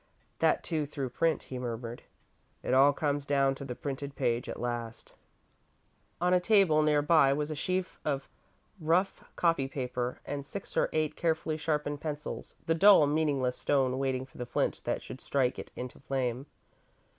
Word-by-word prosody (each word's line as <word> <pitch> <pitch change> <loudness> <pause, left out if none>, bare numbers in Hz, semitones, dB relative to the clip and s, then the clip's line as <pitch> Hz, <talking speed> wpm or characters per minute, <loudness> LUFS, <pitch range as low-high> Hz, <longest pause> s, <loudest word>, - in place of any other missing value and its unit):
"That, - - +3
too, 155 -4 -1
through 140 -3 -4
print," 165 0 +1
he 130 - -6
murmured. 120 -1 -5 0.6
"It - - -1
all 135 +2 +7
comes 145 -1 -1
down 140 -1 +2
to 135 - -8
the 125 -3 -5
printed 140 +1 -5
page 120 -1 0
at - - -5
last." 120 -1 -5 1.1
On 180 +1 +2
a 180 - +5
table, 185 -6 +4
near 150 -1 +3
by, 150 -3 +5
was 150 +2 -2
a - - -3
sheaf 185 +5 -2
of 140 -2 -2 0.5
rough 170 +4 +1
copy 165 -6 +2
paper, 125 -2 -3
and 145 -1 -4
six 195 +7 -8
or - - +2
eight 155 -1 0
carefully 160 -1 0
sharpened 150 -2 -2
pencils 150 -1 -5
the 165 - +2
dull, 190 -1 +7
meaningless 145 -4 0
stone 130 -2 +1
waiting 130 -1 -1
for 130 - -17
the 125 - -4
flint - - -1
that - - -1
should 130 - -9
strike 130 -3 0
it - - -7
into 125 0 -7
flame. 130 0 -2
140 Hz, 170 wpm, -30 LUFS, 130-155 Hz, 1.1 s, all